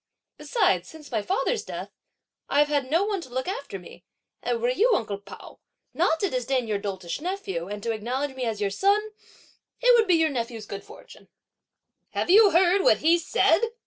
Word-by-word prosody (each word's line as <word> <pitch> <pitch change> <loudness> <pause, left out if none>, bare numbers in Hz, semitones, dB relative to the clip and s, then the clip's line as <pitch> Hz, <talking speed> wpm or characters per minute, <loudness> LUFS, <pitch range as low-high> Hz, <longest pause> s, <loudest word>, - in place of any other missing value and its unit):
Besides, 190 - +1
since 310 -3 -13
my 220 -3 0
father's 400 - -1
death, - - -7 0.6
I've 290 +1 +3
had 285 -3 0
no 330 +6 +3
one 405 -3 -2
to 295 - -11
look 255 +1 -3
after 405 +6 -5
me, - - -14 0.4
and 465 - -1
were 480 +1 +1
you, - - +3
uncle 205 -4 -3
Pao, 200 - -13 0.3
not 325 - +1
to 395 - +1
disdain 255 -1 -1
your 210 -2 -1
doltish 190 +1 -5
nephew, 315 - -4
and 205 0 -6
to 230 - -1
acknowledge 255 +6 -3
me 255 -1 -3
as 220 -3 -2
your 200 -1 -1
son, 400 - +3 0.8
it - - +5
would 455 -2 +3
be 360 - +5
your 320 -2 +2
nephew's 230 -4 -4
good 200 -1 -7
fortune!" - - -15 0.9
"Have - - 0
you 420 +1 +8
heard 365 +2 +4
what 220 - +4
he 340 +2 +5
said?" 330 +1 +2
285 Hz, 190 wpm, -25 LUFS, -, 0.9 s, you